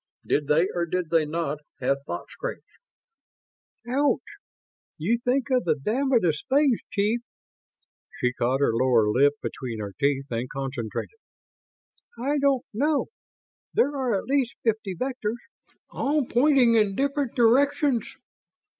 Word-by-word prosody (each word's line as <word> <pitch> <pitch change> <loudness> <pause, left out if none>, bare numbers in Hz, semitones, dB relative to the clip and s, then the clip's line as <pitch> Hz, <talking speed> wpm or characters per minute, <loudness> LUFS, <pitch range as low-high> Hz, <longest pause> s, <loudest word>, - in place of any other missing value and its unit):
Did 145 -1 0
they 160 +5 +3
or 175 -1 -1
did 180 -1 -2
they 160 -2 +3
not 155 -2 -2 0.2
have 135 +2 +1
thought - - -4
screens?" - - -6 1.2
"Ouch! 280 +4 +2 0.8
You 215 +10 0
think 265 +2 0
of 250 -2 +3
the 160 -3 +2
damnedest 215 - 0
things, 275 -3 +3
chief." 215 +3 0 1.0
She 125 0 +1
caught 125 +3 0
her 140 - +3
lower 115 -2 +3
lip 140 +5 +4
between 120 -4 -5
her 100 -2 -5
teeth 140 -1 +1
and 120 +2 -2
concentrated. 135 - -5 0.6
"... - - -28
I 285 +4 0
don't 275 -2 +2
know. 285 +5 +1 0.7
There 295 -10 +2
are 255 -5 0
at - - -4
least 270 -3 0
fifty 220 -4 -1
vectors, 240 0 -3 0.5
all 290 0 0
pointing 250 -1 +4
in 210 -3 +3
different 280 0 -1
directions." 265 +1 +2
220 Hz, 135 wpm, -25 LUFS, -, 1.2 s, lip